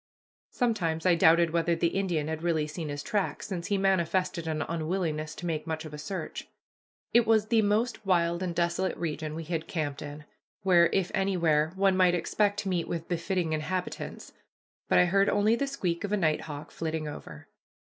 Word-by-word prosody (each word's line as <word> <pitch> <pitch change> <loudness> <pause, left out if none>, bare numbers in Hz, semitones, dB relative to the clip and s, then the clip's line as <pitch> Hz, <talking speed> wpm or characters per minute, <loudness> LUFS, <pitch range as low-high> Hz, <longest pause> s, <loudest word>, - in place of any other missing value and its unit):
Sometimes 180 -10 -1
I 180 - +6
doubted 165 0 +5
whether 170 0 +1
the 170 0 +1
Indian 175 -6 -1
had 160 0 -3
really 165 -3 +1
seen 155 +1 -5
his 145 0 -4
tracks, 205 -4 -2
since 175 -4 -4
he 200 - +1
manifested 185 -3 +1
an 155 -1 -1
unwillingness 160 -2 -2
to 175 - -7
make 160 -2 -2
much 160 0 -3
of 155 - -9
a 150 - -7
search. 185 +5 -5 0.7
It 235 -1 +5
was 220 -1 +3
the 230 -2 +4
most 215 +2 0
wild 170 -2 +1
and 180 -2 -2
desolate 175 +2 0
region 155 -2 -3
we 165 - -5
had 165 0 -3
camped 145 -5 -3
in, 150 +1 -8 0.4
where, 175 -3 +5
if 190 -2 0
anywhere, 170 -5 +2
one 195 0 +3
might 180 -1 +4
expect 205 +3 +1
to 200 - -4
meet 175 -2 -1
with 165 -1 -4
befitting 175 -1 -1
inhabitants, 180 +4 -4 0.6
but - - +4
I 180 - +6
heard 195 +3 +3
only 210 +2 +3
the 280 +3 -1
squeak 180 -11 -2
of 205 - -3
a 210 - +2
nighthawk 155 -3 -2
flitting 160 -1 -3
over. 80 - -9
170 Hz, 190 wpm, -28 LUFS, 160-195 Hz, 0.7 s, I